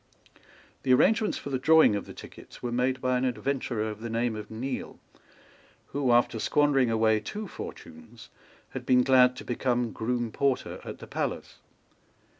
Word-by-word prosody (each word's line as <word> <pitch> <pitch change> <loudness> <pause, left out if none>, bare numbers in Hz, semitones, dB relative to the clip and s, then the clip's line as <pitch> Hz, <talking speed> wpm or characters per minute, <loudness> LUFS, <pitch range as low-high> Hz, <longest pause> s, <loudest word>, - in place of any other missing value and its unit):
The 130 -1 +4
arrangements 220 - +2
for 140 - -7
the 130 - -1
drawing 160 -5 +5
of 100 - -4
the - - -9
tickets - - -13
were 120 - -2
made 125 +1 0
by 130 -1 +1
an - - -2
adventurer 125 -2 -2
of 110 0 -7
the 115 - -5
name 115 0 -1
of 105 -1 -7
Neale, 125 +4 -5 0.9
who, 135 -3 0
after 120 -1 +3
squandering 140 -1 +2
away 110 -1 +2
two 210 - -6
fortunes, 105 - -10 0.4
had - - -6
been 125 -1 +4
glad 125 -1 +5
to - - -9
become 120 -1 -1
groom 120 +1 -2
porter 135 0 -1
at - - -7
the - - -10
palace. - - -4
125 Hz, 165 wpm, -27 LUFS, 115-130 Hz, 0.9 s, drawing